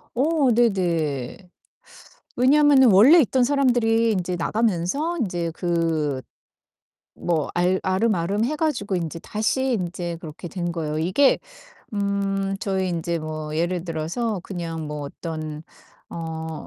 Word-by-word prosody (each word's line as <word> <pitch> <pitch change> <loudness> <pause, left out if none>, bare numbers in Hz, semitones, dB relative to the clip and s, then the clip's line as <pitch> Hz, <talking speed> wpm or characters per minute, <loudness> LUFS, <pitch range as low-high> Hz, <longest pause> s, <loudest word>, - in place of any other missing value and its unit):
어 280 0 +2
네네. 170 - 0 1.0
왜냐면은 270 -1 +5
원래 240 - +8
있던 255 0 +2
사람들이 240 -4 +2
인제 180 -3 -1
나가면서 220 - 0
인제 175 -5 -2
그 165 -6 0 1.0
뭐 160 -4 -1
알 180 +2 +2
알음알음 190 +1 +1
해 300 +5 -1
가지고 240 - -1
인제 165 -1 -4
다시 260 +5 -1
인제 175 -3 -3
그렇게 160 +1 -8
된 175 -1 -3
거예요. 155 -2 -3
이게 185 - +3 0.5
음 195 -1 -1
저희 190 -2 -1
인제 170 -1 -2
뭐 155 -1 -5
예를 175 +1 -1
들어서 175 +6 -2
그냥 165 -5 -5
뭐 150 -1 -5
어떤 155 +1 -6 0.5
어 160 -1 -6
180 Hz, 240 characters per minute, -23 LUFS, 165-230 Hz, 1.0 s, 원래